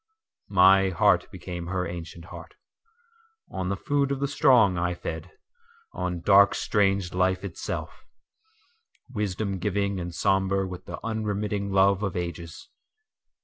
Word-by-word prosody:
…My 95 Hz, 0 st, +5 dB
heart 90 Hz, -, +2 dB
became 85 Hz, -1 st, -7 dB
her 95 Hz, 0 st, -2 dB
ancient 85 Hz, -1 st, -8 dB
heart:On 455 Hz, -, -11 dB
the 100 Hz, -, -2 dB
food 140 Hz, +4 st, 0 dB
of 140 Hz, -, -1 dB
the 140 Hz, -, 0 dB
strong 120 Hz, -8 st, +4 dB
I 90 Hz, 0 st, -1 dB
fed, 80 Hz, 0 st, -6 dB, 0.6 s
on 90 Hz, -2 st, -3 dB
dark 100 Hz, +2 st, +5 dB
strange 95 Hz, -3 st, +1 dB
life 95 Hz, 0 st, +1 dB
itself:Wisdom 125 Hz, -, -7 dB
giving 100 Hz, 0 st, -1 dB
and 90 Hz, 0 st, -5 dB
sombre 95 Hz, +2 st, +1 dB
with 90 Hz, 0 st, -8 dB
the -, -, -6 dB
unremitting 105 Hz, -2 st, -2 dB
love 95 Hz, 0 st, +3 dB
of 95 Hz, -4 st, -2 dB
ages. 85 Hz, -2 st, -6 dB
95 Hz, 120 wpm, -26 LUFS, 90-110 Hz, 0.6 s, My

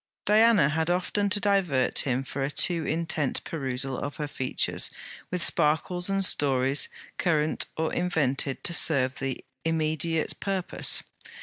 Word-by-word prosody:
Diana 215 Hz, -6 st, +4 dB
had 160 Hz, +2 st, -1 dB
often 185 Hz, +3 st, 0 dB
to 205 Hz, -, +2 dB
divert 190 Hz, -11 st, +1 dB
him 130 Hz, -1 st, 0 dB
from 135 Hz, +1 st, -6 dB
a 135 Hz, -, -1 dB
too 165 Hz, +2 st, 0 dB
intent 160 Hz, -3 st, -1 dB
perusal 135 Hz, -3 st, -3 dB
of 145 Hz, -, -5 dB
her 150 Hz, -, -4 dB
features 130 Hz, -2 st, 0 dB, 0.4 s
with 180 Hz, -3 st, -1 dB
sparkles 175 Hz, +3 st, +1 dB
and 195 Hz, 0 st, +1 dB
stories 135 Hz, -3 st, +3 dB, 0.3 s
current 155 Hz, -3 st, 0 dB
or 160 Hz, 0 st, -1 dB
invented 140 Hz, -6 st, -1 dB
to 170 Hz, -, 0 dB
serve 135 Hz, -6 st, +4 dB
the 135 Hz, -1 st, -4 dB, 0.2 s
immediate 160 Hz, 0 st, -1 dB
purpose. 195 Hz, -2 st, 0 dB
160 Hz, 135 wpm, -26 LUFS, 135-180 Hz, 0.4 s, Diana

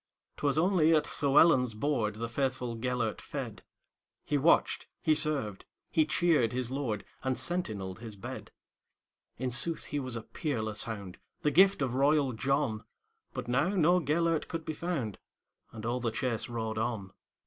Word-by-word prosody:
'T 145 Hz, -, -1 dB
was 140 Hz, -, +1 dB
only 165 Hz, -2 st, +4 dB
at 150 Hz, -1 st, -1 dB
Llewelyn's 135 Hz, -4 st, +5 dB
boardThe 115 Hz, -4 st, -1 dB
faithful 125 Hz, -1 st, -2 dB
Gêlert 120 Hz, -1 st, -1 dB
fed; -, -, -6 dB, 0.6 s
He 145 Hz, -, 0 dB
watched, 150 Hz, +4 st, +3 dB
he 155 Hz, -, +3 dB
served, 150 Hz, -10 st, +1 dB, 0.3 s
he 155 Hz, -1 st, +3 dB
cheered 155 Hz, -10 st, +2 dB
his 125 Hz, -1 st, -1 dB
lord, 125 Hz, -7 st, -2 dB, 0.2 s
And 130 Hz, -1 st, 0 dB
sentineled 110 Hz, -, -2 dB
his 110 Hz, -3 st, -8 dB
bed.In 125 Hz, +5 st, -10 dB
sooth 155 Hz, +8 st, 0 dB
he 145 Hz, -, -2 dB
was 130 Hz, -3 st, -4 dB
a 115 Hz, -, -5 dB
peerless 110 Hz, -7 st, -2 dB
hound, 100 Hz, -5 st, -6 dB, 0.2 s
The 150 Hz, -, +3 dB
gift 190 Hz, -1 st, +5 dB
of 125 Hz, -2 st, -1 dB
royal 140 Hz, 0 st, +3 dB
John; 130 Hz, -2 st, 0 dB, 0.5 s
But -, -, -4 dB
now 135 Hz, +8 st, +2 dB
no 175 Hz, 0 st, +4 dB
Gêlert 165 Hz, +1 st, +1 dB
could 165 Hz, -1 st, -5 dB
be 155 Hz, -, -3 dB
found, 150 Hz, -, -3 dB, 0.5 s
And 110 Hz, -1 st, -8 dB
all 120 Hz, +2 st, 0 dB
the 120 Hz, -1 st, 0 dB
chase 115 Hz, +1 st, -2 dB
rode 110 Hz, -2 st, -3 dB
on. 110 Hz, -4 st, -2 dB
130 Hz, 155 wpm, -30 LUFS, 115-155 Hz, 0.6 s, Llewelyn's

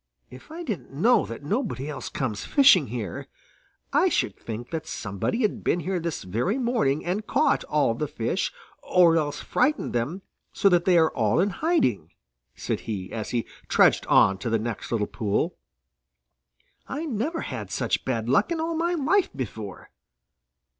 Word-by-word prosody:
"If 130 Hz, -, -13 dB
I 330 Hz, +3 st, -7 dB
didn't 215 Hz, -, -5 dB
know 220 Hz, -, +3 dB
that 115 Hz, +4 st, -8 dB
nobody 205 Hz, -, -2 dB
else 150 Hz, -3 st, -5 dB
comes 115 Hz, -7 st, -3 dB
fishing 260 Hz, -, +5 dB
here, 110 Hz, -6 st, -5 dB, 0.7 s
I -, -, +4 dB
should -, -, 0 dB
think 115 Hz, +2 st, -7 dB
that 160 Hz, -2 st, -4 dB
somebody 105 Hz, -, -2 dB
had 210 Hz, -, -1 dB
been 175 Hz, -, +1 dB
here 185 Hz, 0 st, -1 dB
this 170 Hz, -1 st, -4 dB
very 120 Hz, -, -1 dB
morning 235 Hz, -, 0 dB
and 195 Hz, +5 st, -2 dB
caught -, -, +2 dB
all -, -, +2 dB
the -, -, -3 dB
fish -, -, -2 dB, 0.3 s
or 175 Hz, -2 st, +4 dB
else 150 Hz, -2 st, -1 dB
frightened 285 Hz, +4 st, 0 dB
them 145 Hz, +11 st, -2 dB, 0.3 s
so 200 Hz, -, +3 dB
that 175 Hz, -2 st, +3 dB
they 180 Hz, -2 st, +5 dB
are 160 Hz, -1 st, +4 dB
all 110 Hz, +5 st, +1 dB
in 200 Hz, +3 st, +2 dB
hiding," 130 Hz, -, 0 dB, 0.4 s
said -, -, -3 dB
he, 95 Hz, -4 st, -4 dB
as 110 Hz, -2 st, -4 dB
he 120 Hz, -2 st, -1 dB, 0.2 s
trudged -, -, +4 dB
on 95 Hz, -1 st, +5 dB
to 120 Hz, -, -3 dB
the 115 Hz, -, +2 dB
next 115 Hz, +1 st, -5 dB
little 110 Hz, -3 st, +1 dB
pool. 100 Hz, 0 st, -1 dB, 1.3 s
"I 300 Hz, +4 st, -4 dB
never 295 Hz, +5 st, -2 dB
had -, -, -5 dB
such -, -, -1 dB
bad 115 Hz, -4 st, -2 dB
luck 165 Hz, -, +3 dB
in 335 Hz, -, -1 dB
all 330 Hz, +1 st, -1 dB
my 340 Hz, +2 st, 0 dB
life 345 Hz, +6 st, +2 dB
before. 110 Hz, -6 st, -6 dB
160 Hz, 170 wpm, -25 LUFS, -, 1.3 s, fishing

